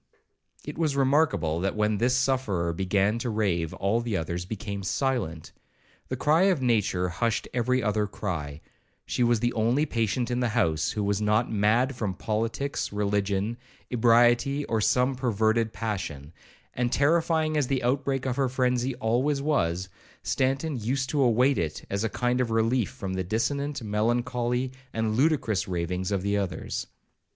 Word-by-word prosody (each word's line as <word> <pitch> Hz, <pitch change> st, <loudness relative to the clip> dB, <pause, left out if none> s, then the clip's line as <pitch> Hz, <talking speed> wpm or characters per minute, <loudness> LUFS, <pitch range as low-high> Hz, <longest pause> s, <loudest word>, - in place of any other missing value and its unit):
It -, -, -7 dB
was 155 Hz, -4 st, +1 dB
remarkable, 135 Hz, -, +2 dB
that 95 Hz, +2 st, -1 dB
when 105 Hz, -1 st, +1 dB
this 125 Hz, +2 st, +2 dB
sufferer 125 Hz, -11 st, 0 dB
began 95 Hz, +5 st, +1 dB
to 120 Hz, -, -2 dB
rave, 95 Hz, -7 st, 0 dB
all 100 Hz, +5 st, 0 dB
the 115 Hz, -4 st, -2 dB
others 85 Hz, +2 st, -3 dB
became 100 Hz, 0 st, -5 dB
silent. 95 Hz, -, -2 dB, 0.6 s
The -, -, -3 dB
cry 160 Hz, +5 st, +3 dB
of 190 Hz, -6 st, +3 dB
nature 105 Hz, -7 st, +1 dB
hushed 115 Hz, +6 st, -1 dB
every 125 Hz, +1 st, +1 dB
other 105 Hz, -1 st, +1 dB
cry,—she 85 Hz, +3 st, -5 dB
was 120 Hz, -2 st, +2 dB
the 120 Hz, 0 st, +1 dB
only 120 Hz, +6 st, +2 dB
patient 120 Hz, -1 st, -1 dB
in 120 Hz, -, 0 dB
the 125 Hz, -2 st, +1 dB
house 80 Hz, -6 st, +1 dB
who 105 Hz, -, -2 dB
was 100 Hz, 0 st, 0 dB
not 105 Hz, +3 st, +1 dB
mad 115 Hz, +6 st, +2 dB
from 105 Hz, -6 st, -3 dB
politics, 115 Hz, +8 st, -2 dB
religion, 100 Hz, +1 st, -1 dB, 0.3 s
ebriety, 120 Hz, +4 st, +3 dB
or 110 Hz, -1 st, 0 dB
some 125 Hz, +5 st, +2 dB
perverted 115 Hz, -2 st, +1 dB
passion; 85 Hz, -11 st, -5 dB, 0.4 s
and 120 Hz, -1 st, -1 dB
terrifying 160 Hz, +2 st, +2 dB
as 145 Hz, -4 st, +1 dB
the 130 Hz, -2 st, -1 dB
outbreak 135 Hz, +1 st, 0 dB
of 130 Hz, -1 st, -1 dB
her 135 Hz, -2 st, +1 dB
frenzy 125 Hz, 0 st, 0 dB
always 125 Hz, +6 st, +1 dB
was, 95 Hz, -, 0 dB, 0.4 s
Stanton 135 Hz, +3 st, 0 dB
used 130 Hz, +4 st, -1 dB
to 145 Hz, -, +1 dB
await 125 Hz, +2 st, +3 dB
it 80 Hz, -2 st, -3 dB
as 100 Hz, +2 st, -1 dB
a 115 Hz, -, 0 dB
kind 125 Hz, +3 st, 0 dB
of 120 Hz, -, -1 dB
relief 115 Hz, +1 st, +1 dB
from 100 Hz, -7 st, -6 dB
the 95 Hz, 0 st, -1 dB
dissonant, 140 Hz, +8 st, -2 dB
melancholy, 120 Hz, +3 st, 0 dB, 0.2 s
and 110 Hz, -1 st, 0 dB
ludicrous 130 Hz, -, +1 dB
ravings 90 Hz, +1 st, -2 dB
of 95 Hz, -2 st, 0 dB
the 100 Hz, +1 st, +1 dB
others. 95 Hz, -3 st, -3 dB
115 Hz, 160 wpm, -27 LUFS, 100-130 Hz, 0.6 s, cry